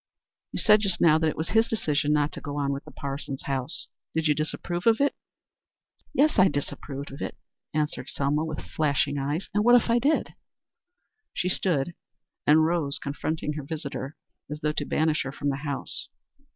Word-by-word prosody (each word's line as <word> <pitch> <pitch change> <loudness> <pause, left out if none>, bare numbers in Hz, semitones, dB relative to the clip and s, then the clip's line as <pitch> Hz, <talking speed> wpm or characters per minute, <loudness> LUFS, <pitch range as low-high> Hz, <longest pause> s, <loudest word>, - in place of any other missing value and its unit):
You - - -4
said 210 -1 +6
just 195 -4 0
now 160 -2 +6
that 160 0 +2
it - - -5
was 160 - -2
his 225 0 +4
decision 150 -8 +1
not 150 0 +2
to - - -8
go 145 -1 -5
on 140 -1 +1
with 140 - -6
the - - -11
Parsons 140 -1 -5
house. 135 +2 -1 0.3
Did 160 -1 +2
you 150 - +5
disapprove 175 +5 -2
of 225 -1 +5
it?" 280 0 +3 1.0
"Yes, 295 -5 +3
I 185 - +8
disapproved 140 -1 -4
of 135 - -9
it," - - -4 0.3
answered 150 -1 -2
Selma 145 +2 0
with 155 -1 -4
flashing 145 -2 0
eyes. 145 +6 -2
"And 210 +1 +2
what 240 +2 +7
if 230 - -2
I 235 - +4
did?" 290 +6 +1 1.0
She 180 - 0
rose 175 -4 0 0.5
and 150 - +7
stood 160 -3 +1
confronting 150 +2 -2
her 150 -1 -5
visitor 140 -1 -5 0.3
as 150 +1 -5
though 150 0 +1
to 145 - -2
banish 155 +1 +1
her 135 - -3
from 145 +1 -2
the 135 - -1
house. 145 -1 -3
150 Hz, 190 wpm, -27 LUFS, 140-175 Hz, 1.0 s, I